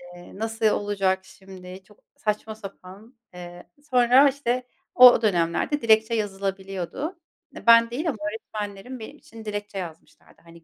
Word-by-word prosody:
eee, 175 - -14
nasıl 225 0 -3
olacak 195 -3 0
şimdi? 190 -1 -13
Çok 210 +1 -23 0.2
saçma 215 +1 -3
sapan. 200 +3 -12 0.2
Eee, 175 0 -10 0.3
sonra 250 +3 +5
işte 255 -2 -2 0.3
o 250 -2 +8
dönemlerde 190 - 0
dilekçe 220 0 +3
yazılabiliyordu. 195 - -4 0.4
E, - - -11
ben 230 0 +7
değil 300 +8 -2
ama 250 - -3
öğretmenlerim, 210 +2 -7
benim 220 - -10
için 225 -1 -14
dilekçe 205 -1 -5
yazmışlardı. 165 -4 -10
Hani, 170 0 -16
210 Hz, 135 wpm, -24 LUFS, 190-230 Hz, 0.4 s, o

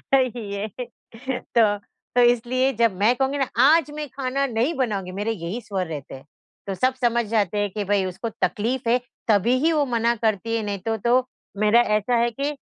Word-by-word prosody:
सही 240 -6 0
है, 200 +2 -3 0.9
तो 210 -3 +4 0.4
तो 245 - +5
इसलिए 245 +2 +3
जब 230 -2 +2
मैं 230 +5 +4
कहूँगी 270 +2 0
ना 270 - 0 0.2
आज 300 +1 +5
मैं 300 -1 -4
खाना 275 +1 -1
नहीं 245 +6 0
बनाऊँगी, 205 -8 -2
मेरे 205 +4 -2
यही 195 +4 -5
स्वर 195 -4 -3
रहते 145 -4 -7
हैं, 135 - -13 0.4
तो 195 - -2
सब 255 +8 +1
समझ 235 -1 +2
जाते 210 -3 0
हैं 205 0 0
कि 210 0 -3
भई 195 -1 +1
उसको 185 +5 -4
तक़लीफ़ 230 +3 0
है 245 - +4 0.3
तभी 220 +4 +3
ही 325 +3 +2
वो 295 -2 +2
मना 235 -2 +1
करती 225 0 -1
है, 225 - -1
नहीं 200 -2 -3
तो 225 - 0
तो 245 +4 +2 0.3
मेरा 215 +3 +5 0.2
ऐसा 225 +4 0
है 235 +1 +2
कि 280 +5 -3
230 Hz, 200 wpm, -23 LUFS, 205-255 Hz, 0.9 s, तो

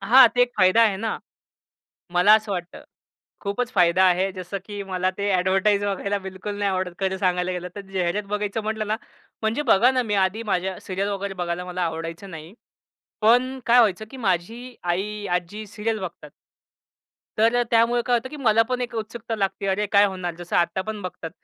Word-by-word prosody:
हां, 240 +5 +7
ते 245 - +5
एक 245 - +1
फायदा 190 +4 +5
आहे 210 -4 +3
ना, 220 +2 -3 0.9
मला 180 +4 +6
असं 215 -2 0
वाटतं. 175 -1 -6 0.6
खूपच 225 +5 -2
फायदा 175 +1 +4
आहे 185 +1 +3
जसं 185 +2 -5
की 205 -1 -6
मला 185 0 0
ते 200 0 0
अ‍ॅडव्हर्टाइज 195 +2 +2
बघायला 200 0 -1
बिलकुल 190 +2 -6
नाही 200 -1 +1
आवडत 185 -2 -2
खरं 190 0 0
सांगायला 180 -1 0
गेलं 180 0 -4
तर. - - -4
जाहिरात 190 0 -2
बघायचं 210 +1 -2
म्हटलं 215 0 -2
ना, 215 +1 0 0.5
म्हणजे 220 +6 0
बघा 240 +6 +5
ना 255 -1 +1
मी - - +2
आधी 210 +5 -2
माझ्या 185 +1 -1
सीरियल 195 +2 -2
वगैरे 200 -1 -3
बघायला 170 +1 -3
मला 180 0 -4
आवडायचं 165 +3 -4
नाही. 165 +2 -10 0.7
पण 250 +4 +3
काय 240 +1 +6
व्हायचं 215 -2 +2
की 265 - -9
माझी 225 +5 -2
आई, 205 +4 -2
आज्जी 205 +5 -8
सीरियल 215 +2 -3
बघतात. 180 -2 -7 1.1
तर 225 +2 +4
अ, - - +3
त्यामुळे 235 +1 +3
काय 245 - +3
होतं 240 +2 -4
की 300 - -9
मला 225 -5 +3
पण 250 0 -1
एक 245 -1 -4
उत्सुकता 225 +1 -5
लागते, 195 -1 -2
"अरे, 195 +2 0
काय 200 0 +6
होणार," 185 -3 -4
जसं 175 0 -3
आत्ता 175 +2 +1
पण 215 +1 -5
बघतात 180 -2 -6
200 Hz, 190 wpm, -23 LUFS, 185-220 Hz, 1.1 s, हां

